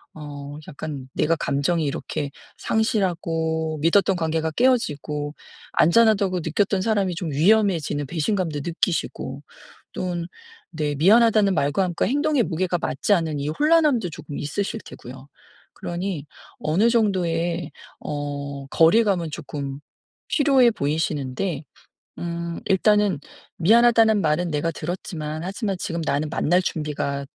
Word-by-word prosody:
어 145 -1 -8
약간 140 -2 -7
내가 165 +2 +2
감정이 155 +4 0
이렇게 140 0 -3 0.3
상실하고 165 -8 0
믿었던 190 +4 +3
관계가 160 -1 -1
깨어지고 150 - 0 0.4
안전하다고 195 0 +4
느꼈던 190 +4 +1
사람이 195 -4 0
좀 165 -2 -4
위험해지는 165 -3 +2
배신감도 165 0 -1
느끼시고 170 0 -2 0.5
또는 175 -2 -3 0.4
네 150 -3 -2
미안하다는 210 +4 +5
말과 145 +5 +1
함께 175 -2 -1
행동의 290 -1 +2
무게가 180 -1 -1
맞지 165 +7 0
않은 160 -5 0
이 140 - -3
혼란함도 295 - +3
쪼금 145 -1 -7
있으실 200 +9 -3
테고요. 130 +2 -11 0.5
그러니 175 -3 -4 0.3
어느 185 +10 +2
정도의 175 -7 0 0.3
어 140 -1 -5
거리감은 175 +2 +3
쪼끔 140 -3 -6 0.5
필요해 270 -5 +4
보이시는데 150 - -2 0.6
음. 170 0 -4
일단은 205 -3 +3 0.4
"미안하다는 225 +3 +5
말은 165 +2 +1
내가 150 +2 0
들었지만 155 -1 -5
하지만 195 +1 -3
지금 170 -1 -3
나는 145 +2 0
만날 175 +4 +2
준비가 150 -4 -3
170 Hz, 300 characters per minute, -23 LUFS, 150-200 Hz, 0.6 s, 미안하다는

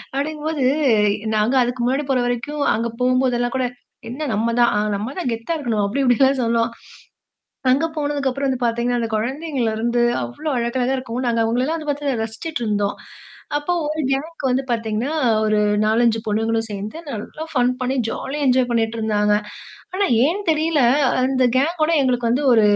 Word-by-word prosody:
அப்படிங்கும்போது, 300 -1 -2 0.7
நாங்க 215 +5 +2
அதுக்கு 245 0 -1
முன்னாடி 270 +4 +1
போற 260 -2 +2
வரைக்கும், 245 +5 -2
அங்க 230 +2 -1
போம்போதெல்லாம் 250 -1 +1
கூட, 260 -1 +1 0.4
"என்ன 290 +5 -4
நம்ம 230 +2 0
தான் 240 -2 +4 0.2
நம்ம 220 +7 -4
தான் 305 -9 -1
கெத்தா 230 +9 -3
இருக்கணும்" 230 -7 -1
அப்படி 270 +8 -1
இப்படிலாம் 265 +1 +3
சொல்லுவோம். 230 0 +1 1.0
அங்கே 280 +6 +2
போனதுக்கப்பறம் 280 -2 -1
வந்து 260 -1 -2
பார்த்திங்கன்னா, 240 +1 0
அந்த 225 - -2
கொழந்தைங்கள்லருந்து 240 -2 -1 0.2
அவ்வளோ 120 - -5
அழகழகா 245 +2 0
இருக்கும். 255 0 -4
நாங்க 230 -1 +1
அவங்களலாம் 250 +8 0
வந்து 305 -2 -6
பார்த்து 280 -5 -2
ரசிச்சிட்டு 240 +6 -5
இருந்தோம். 205 -1 0 0.6
அப்போ 295 +4 -2 0.2
ஒரு 310 +1 -2
கேங்குக்கு 280 0 -2
வந்து 265 +2 +1
பார்த்திங்கன்னா, 230 +5 -1 0.3
ஒரு 215 0 +2 0.3
4,5 225 +1 +3
பொண்ணுங்களும் 225 +1 0
சேர்ந்து 205 +8 -5
நல்லா 260 +8 -6
ஃபன் 250 -1 +2
பண்ணி 260 +2 -1
ஜாலியா 290 +2 -4
என்ஜாய் 250 -1 +3
பண்ணிட்டு 230 -1 0
இருந்தாங்க. 210 -1 +2 0.6
ஆனா 400 +1 +2 0.2
ஏன் 375 +6 -1
தெரியல, 310 -2 +2 0.4
அந்த 260 -1 +2
கேங்கோட 315 +3 +1
எங்களுக்கு 245 -3 +1
வந்து 270 +5 +1
ஒரு 220 - +5
250 Hz, 155 wpm, -21 LUFS, 230-280 Hz, 1.0 s, ஒரு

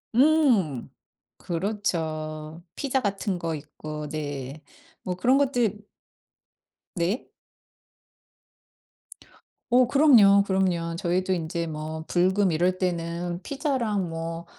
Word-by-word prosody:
음. 250 - +3 0.5
그렇죠. 165 -4 -3
피자 270 -1 0
같은 200 -3 -2
거 165 -2 -3
있고 150 +1 -7
네 145 -1 -5 0.4
뭐 180 - -2
그런 250 +8 +3
것들 245 -7 +1 1.2
네. 180 +7 -1 2.4
어 250 +1 +5
그럼요, 235 -8 +6
그럼요. 180 -4 0
저희도 185 +1 0
인제 170 -1 -2
뭐 155 +1 -5
불금 185 +1 +2
이럴 180 +3 +1
때는 175 -1 -2
피자랑 240 - -1
뭐 165 +1 -5
180 Hz, 170 characters per minute, -26 LUFS, 165-210 Hz, 2.4 s, 그럼요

